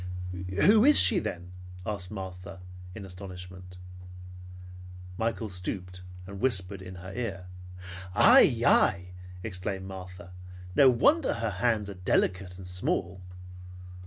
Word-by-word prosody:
"Who 215 +2 +6
is 295 +3 +7
she 205 - +8
then?" 90 +1 -6 0.3
asked 100 -4 -4
Martha 95 -1 -8 0.4
in 105 -3 -8
astonishment. 90 -1 -11 1.4
Michael 115 +2 -3
stooped 90 -1 -6 0.2
and 100 +1 -9
whispered 100 -5 0
in 95 0 -10
her 95 +2 -10
ear. 100 -6 -5 0.7
"Ai! - - +6
Ai!" 90 +1 +3 0.3
exclaimed 95 -2 -5
Martha. 90 -1 -10 0.4
"No 135 - +6
wonder 285 - +2
her 115 -2 -3
hands 105 +1 -1
are 100 - -7
delicate 90 0 -1
and 95 - -10
small! 90 +1 -3
95 Hz, 115 wpm, -27 LUFS, 90-105 Hz, 1.4 s, she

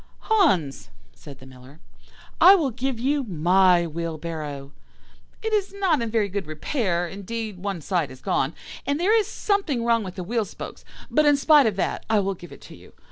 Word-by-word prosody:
"'Hans,' 190 - +1 0.2
said 140 - -13
the 130 - -15
Miller, 130 +3 -15 0.6
'I 380 +2 +9
will 305 -8 0
give 255 0 -3
you 280 +3 0
my 180 -2 +3
wheelbarrow. 155 -3 -5 0.7
It 445 0 -2
is 400 -2 0
not 375 -9 +1
in 230 - -2
very 220 -2 +1
good 200 -3 -4
repair; 175 - -1
indeed, 205 +2 -6
one 195 -3 -4
side 170 -3 -1
is 130 0 -12
gone, 135 +3 -1 0.3
and 285 +2 0
there 400 +6 +3
is 430 -3 +2
something 395 - -1
wrong 230 -1 +2
with 185 -2 -7
the 185 - -5
wheel 225 +4 -1
spokes; 200 - -9 0.3
but 305 -1 +3
in 290 -1 +5
spite 290 -2 +5
of 210 - -1
that 190 - -2
I 220 - +3
will 195 0 -1
give 175 -1 -13
it - - -13
to - - -12
you. - - -17
200 Hz, 190 wpm, -24 LUFS, 170-280 Hz, 0.7 s, I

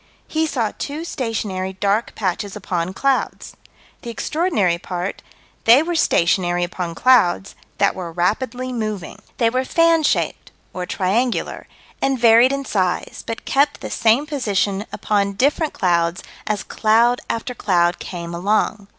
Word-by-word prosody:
He 320 0 0
saw 235 -8 -1
two 300 +3 -4
stationary 210 - -3
dark 200 +4 0
patches 195 0 -2
upon 180 -3 -2
clouds. 275 +3 -1 0.5
The 235 - -7
extraordinary 235 - 0
part: 180 +1 -4 0.4
They 240 +6 +7
were 345 +1 -2
stationary 175 - +2
upon 175 -1 -4
clouds 200 -5 +3 0.2
that 200 0 +3
were 175 -3 -6
rapidly 250 +9 -1
moving. 215 -6 -4 0.2
They 230 -2 +2
were 255 +1 0
fan 330 +3 +3
shaped 300 - 0 0.2
or 180 -1 -4
triangular 215 +8 -1 0.3
and 270 -1 +1
varied 235 +2 +6
in 275 0 -2
size, 185 -6 -1
but 225 - -5
kept 285 +1 +1
the - - -6
same 230 +6 +3
position 205 - -1
upon 200 -1 0
different 290 - +1
clouds 170 -1 +1 0.2
as 210 -1 -1
cloud 230 +3 +2
after 230 +2 -3
cloud 175 -6 +1
came 170 -2 -6
along. 200 +3 0
215 Hz, 140 wpm, -20 LUFS, 185-255 Hz, 0.5 s, They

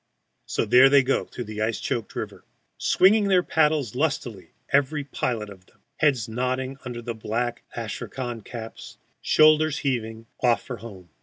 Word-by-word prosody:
So - - -1
there 130 +2 +7
they 140 -1 +6
go 135 +1 0
through 125 - -7
the 110 -1 -6
ice 110 +1 0
choked 115 -4 -3
river, - - -6 0.4
swinging 205 +2 +4
their 185 -2 +4
paddles 150 -8 +1
lustily, 125 - -2 0.2
every 145 +2 +2
pilot 120 -5 -3
of 95 -1 -15
them, - - -27 0.2
heads 135 -8 +2
nodding 130 +3 -2
under 120 -2 -6
black 120 +2 -3
astrakhan 120 +1 -5
caps, 115 +1 -9 0.2
shoulders 155 -1 +4
heaving, 115 -4 -2 0.2
off 120 -2 +3
for 125 - -6
home. 95 -7 -11
125 Hz, 150 wpm, -25 LUFS, 115-140 Hz, 0.4 s, there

